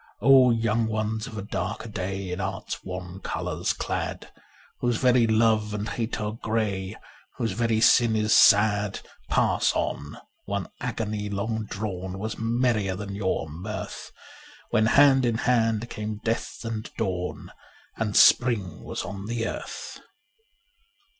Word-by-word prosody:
Oh, 135 Hz, -2 st, +7 dB
young 115 Hz, -1 st, +1 dB
ones 110 Hz, 0 st, -2 dB
of 110 Hz, -, -8 dB
a 100 Hz, -, -4 dB
darker 110 Hz, +2 st, -4 dB
day, 95 Hz, -3 st, -4 dB
In 90 Hz, +2 st, -3 dB
Art's -, -, -4 dB
wan 90 Hz, 0 st, -7 dB
colours -, -, -2 dB
clad, -, -, -4 dB, 0.5 s
Whose 120 Hz, -2 st, +1 dB
very 125 Hz, -2 st, +4 dB
love 110 Hz, -1 st, +2 dB
and 105 Hz, +2 st, -3 dB
hate 115 Hz, -1 st, -3 dB
are 105 Hz, -1 st, -2 dB
grey 110 Hz, -3 st, -2 dB, 0.2 s
— -, -, -28 dB
Whose 115 Hz, -, -1 dB
very 115 Hz, -1 st, +1 dB
sin 115 Hz, -1 st, +5 dB
is 110 Hz, 0 st, +2 dB
sad, 105 Hz, -1 st, +5 dB, 0.3 s
Pass -, -, +2 dB
on; 75 Hz, -, -3 dB, 0.3 s
one 100 Hz, -3 st, -3 dB
agony 110 Hz, -4 st, -3 dB
long 110 Hz, +2 st, -2 dB
drawn 95 Hz, -3 st, -5 dB
Was 110 Hz, +3 st, -4 dB
merrier 115 Hz, -4 st, +1 dB
than 100 Hz, +1 st, -6 dB
your 95 Hz, -5 st, -1 dB
mirth, 90 Hz, +8 st, -6 dB, 0.6 s
When 110 Hz, 0 st, +3 dB
hand 135 Hz, +1 st, +6 dB
in 120 Hz, -2 st, +1 dB
hand 115 Hz, -2 st, +1 dB
came 105 Hz, 0 st, -4 dB
death 115 Hz, +1 st, -2 dB
and 110 Hz, -1 st, -4 dB
dawn 90 Hz, -4 st, -3 dB, 0.4 s
And 105 Hz, -2 st, -2 dB
spring 110 Hz, -9 st, +4 dB
was -, -, -4 dB
on 100 Hz, 0 st, -6 dB
the 115 Hz, 0 st, -2 dB
earth. -, -, -6 dB
110 Hz, 140 wpm, -26 LUFS, 100-115 Hz, 0.6 s, Oh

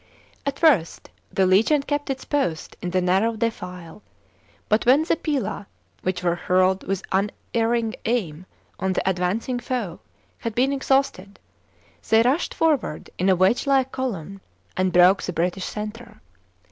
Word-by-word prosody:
At 280 Hz, 0 st, -1 dB
first 265 Hz, -, +2 dB, 0.2 s
the 190 Hz, -, +2 dB
legion 225 Hz, +11 st, +3 dB
kept 290 Hz, 0 st, -2 dB
its 265 Hz, -1 st, -3 dB
post 270 Hz, -, -2 dB
in 180 Hz, -, -3 dB
the 185 Hz, +1 st, +1 dB
narrow 190 Hz, +6 st, +2 dB
defile, 180 Hz, -5 st, -5 dB, 0.7 s
but 215 Hz, +1 st, +2 dB
when 275 Hz, +5 st, +6 dB
the 325 Hz, -, +1 dB
pila, 280 Hz, -, -3 dB, 0.3 s
which 185 Hz, -1 st, -2 dB
were 175 Hz, -1 st, +2 dB
hurled 185 Hz, +2 st, +2 dB
with 195 Hz, -1 st, -2 dB
unerring 225 Hz, +3 st, 0 dB
aim 185 Hz, -8 st, -2 dB, 0.3 s
on 190 Hz, +1 st, 0 dB
the -, -, -2 dB
advancing 190 Hz, +7 st, -1 dB
foe, 235 Hz, -8 st, -4 dB, 0.4 s
had 230 Hz, -2 st, -4 dB
been 265 Hz, +3 st, +2 dB
exhausted, 265 Hz, -8 st, 0 dB, 0.7 s
they 225 Hz, +1 st, +5 dB
rushed 270 Hz, +8 st, 0 dB
forward 300 Hz, -, 0 dB
in 185 Hz, +2 st, +2 dB
a 190 Hz, -, +5 dB
wedge 190 Hz, +10 st, +2 dB
like 265 Hz, -1 st, +2 dB
column 195 Hz, -, -4 dB, 0.3 s
and 185 Hz, 0 st, +1 dB
broke 180 Hz, +2 st, +5 dB
the 180 Hz, -, -4 dB
British 180 Hz, +3 st, -1 dB
centre. 215 Hz, +3 st, -7 dB
210 Hz, 145 wpm, -23 LUFS, 185-260 Hz, 0.7 s, when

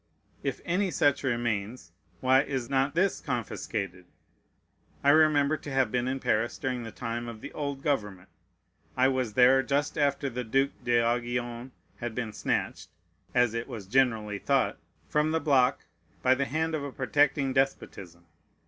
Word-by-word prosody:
If 135 Hz, -2 st, -3 dB
any 185 Hz, +3 st, +1 dB
such 145 Hz, -3 st, +2 dB
remains, 120 Hz, -2 st, -2 dB, 0.3 s
why 130 Hz, +1 st, +5 dB
is 135 Hz, -4 st, -4 dB
not 135 Hz, +2 st, +1 dB
this 190 Hz, +3 st, +1 dB
confiscated? 105 Hz, -, -4 dB, 1.0 s
I 140 Hz, -, +6 dB
remember 155 Hz, -1 st, +4 dB
to 145 Hz, -, -9 dB
have 135 Hz, -4 st, +1 dB
been 125 Hz, 0 st, 0 dB
in 135 Hz, +1 st, -2 dB
Paris 115 Hz, -1 st, 0 dB
during 125 Hz, -2 st, -2 dB
the 115 Hz, -1 st, -7 dB
time 120 Hz, +1 st, -4 dB
of 115 Hz, -2 st, -7 dB
the -, -, -9 dB
old 140 Hz, -2 st, -4 dB
government. 105 Hz, -10 st, -2 dB, 0.7 s
I 130 Hz, +1 st, +4 dB
was 130 Hz, -5 st, -1 dB
there 130 Hz, +2 st, +6 dB
just 140 Hz, +3 st, -1 dB
after 140 Hz, -1 st, +1 dB
the 125 Hz, -1 st, -4 dB
Duke 135 Hz, +4 st, +1 dB
d'Aiguillon 120 Hz, +1 st, 0 dB, 0.3 s
had 120 Hz, -2 st, -5 dB
been 115 Hz, -4 st, -3 dB
snatched -, -, -2 dB, 0.5 s
(as 125 Hz, -2 st, +3 dB
it 115 Hz, 0 st, -3 dB
was 115 Hz, -7 st, -7 dB
generally 110 Hz, -3 st, +1 dB
thought) -, -, +1 dB, 0.3 s
from 150 Hz, +1 st, +1 dB
the 160 Hz, +1 st, +1 dB
block 135 Hz, -5 st, +2 dB, 0.4 s
by 130 Hz, -, +5 dB
the 140 Hz, +1 st, 0 dB
hand 160 Hz, +5 st, -1 dB
of 155 Hz, -2 st, -2 dB
a 140 Hz, -, -5 dB
protecting 140 Hz, +1 st, +1 dB
despotism. 95 Hz, -10 st, -2 dB
130 Hz, 155 wpm, -28 LUFS, 115-140 Hz, 1.0 s, I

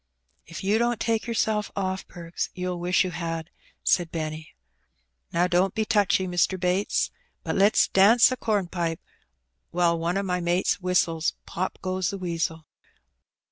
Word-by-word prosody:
'^If 170 Hz, -, -7 dB
you 205 Hz, +3 st, +2 dB
don't 240 Hz, -1 st, +1 dB
take 225 Hz, 0 st, 0 dB
yourself 220 Hz, -2 st, 0 dB
off. 190 Hz, -1 st, -2 dB
Perks, 170 Hz, -1 st, -5 dB
you'll 180 Hz, -1 st, -3 dB
wish 180 Hz, +2 st, +2 dB
you 185 Hz, -, -3 dB
had," 165 Hz, -1 st, -4 dB, 0.3 s
said 175 Hz, -2 st, +2 dB
Benny. 155 Hz, -, -5 dB, 0.8 s
"Now, 170 Hz, +1 st, +2 dB
don't 180 Hz, +1 st, +1 dB
be 220 Hz, -, 0 dB
touchy, 200 Hz, -3 st, +2 dB
Mr. 180 Hz, +1 st, +1 dB
Bates. 180 Hz, +3 st, 0 dB, 0.3 s
But -, -, -2 dB
let's 200 Hz, +2 st, +4 dB
dance 220 Hz, +6 st, +6 dB
a -, -, 0 dB
compipe, 175 Hz, -7 st, -1 dB, 0.7 s
while 170 Hz, -1 st, +1 dB
one 170 Hz, +3 st, -1 dB
o' 200 Hz, -, 0 dB
my 180 Hz, -2 st, -1 dB
mates 175 Hz, +2 st, 0 dB
whistles 170 Hz, -3 st, +1 dB
^Pop 185 Hz, +2 st, -3 dB
goes 185 Hz, -1 st, -1 dB
the 200 Hz, -, -4 dB
Weasel.' 165 Hz, -3 st, -3 dB
180 Hz, 150 wpm, -25 LUFS, 170-200 Hz, 0.8 s, dance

